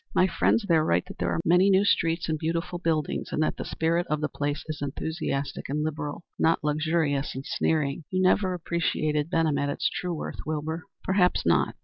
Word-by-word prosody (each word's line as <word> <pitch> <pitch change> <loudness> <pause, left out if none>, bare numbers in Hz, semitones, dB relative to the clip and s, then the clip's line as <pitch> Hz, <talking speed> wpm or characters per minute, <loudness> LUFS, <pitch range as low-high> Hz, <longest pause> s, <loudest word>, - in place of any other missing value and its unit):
My 185 - +5
friends 200 +4 +2
there 160 -2 +4
write 160 - +1
that 195 +1 -11
there - - 0
are - - 0
many 180 +4 +5
new 195 +1 +4
streets 165 -3 +1
and 160 - 0
beautiful 165 +2 -2
buildings, 160 -4 -1
and 155 - +1
that - - 0
the - - -4
spirit 170 +2 0
of 150 0 0
the 150 0 -1
place 145 +1 -2
is 155 -2 -5
enthusiastic 145 -1 -3
and 150 +2 -1
liberal, 150 +1 -4 0.2
not 165 -1 +2
luxurious 150 -2 0
and 135 +1 -6
sneering. 150 -1 0
You 185 - -1
never 185 0 +3
appreciated 155 -3 -1
Benham 160 -5 +1
at 145 0 0
its 140 - 0
true 180 -2 -3
worth, - - -6
Wilbur." 155 +3 -3 0.2
"Perhaps 190 -2 +2
not. 85 0 +2
160 Hz, 200 wpm, -27 LUFS, 150-170 Hz, 0.2 s, My